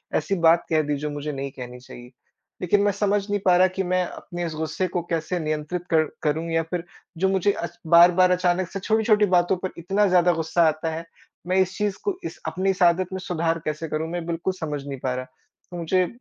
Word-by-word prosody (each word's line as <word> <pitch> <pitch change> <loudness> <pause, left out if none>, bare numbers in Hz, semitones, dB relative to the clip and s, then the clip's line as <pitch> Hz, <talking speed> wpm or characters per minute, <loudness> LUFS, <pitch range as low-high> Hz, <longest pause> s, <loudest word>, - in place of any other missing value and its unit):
ऐसी 155 +6 0
बात 165 +1 +5
कह 155 -1 +3
दी 150 - 0
जो 150 +2 -3
मुझे 145 +1 -4
नहीं 140 -1 -5
कहनी 125 -1 -9
चाहिए। 125 0 -12 0.5
लेकिन 200 +3 +2
मैं 205 - +3
समझ 205 +1 +1
नहीं 205 0 0
पा 180 -2 +6
रहा 185 +1 +6
कि 185 +1 -3
मैं 185 0 +1
अपने 175 0 -6
इस 165 - -4
गुस्से 160 +4 -2
को 175 0 -2
कैसे 165 +2 -1
नियंत्रित 155 +2 -3
कर 160 -1 +5 0.2
करूँ? 160 +2 0
या 165 0 +1
फिर 165 +1 -4 0.3
जो 190 +3 +2
मुझे 190 +1 +2
अच 170 -3 -6
बार-बार 175 +2 +6
अचानक 180 0 +1
से 195 - -4
छोटी-छोटी 215 +1 +3
बातों 180 -1 +2
पर 185 - -1
इतना 195 +5 +1
ज़्यादा 180 -1 +4
गुस्सा 165 +1 +1
आता 155 +1 -1
है, 165 +1 -6 0.4
मैं 185 +1 +1
इस 185 0 -2
चीज़ 205 -2 -1
को 400 -3 -1
इस - - -6
अपनी 190 +1 -1
इस 190 -1 -1
आदत 175 +1 +4
में 190 - -3
सुधार 165 -2 -1
कैसे 155 +1 -3
करूँ? 155 +2 -2
मैं 175 -1 -4
बिल्कुल 170 +2 -2
समझ 150 -3 -4
नहीं 135 -2 -5
पा 130 0 -2
रहा। 130 0 -4 0.5
तो 175 - -6
मुझे 180 +2 +1
175 Hz, 225 wpm, -24 LUFS, 160-185 Hz, 0.5 s, पा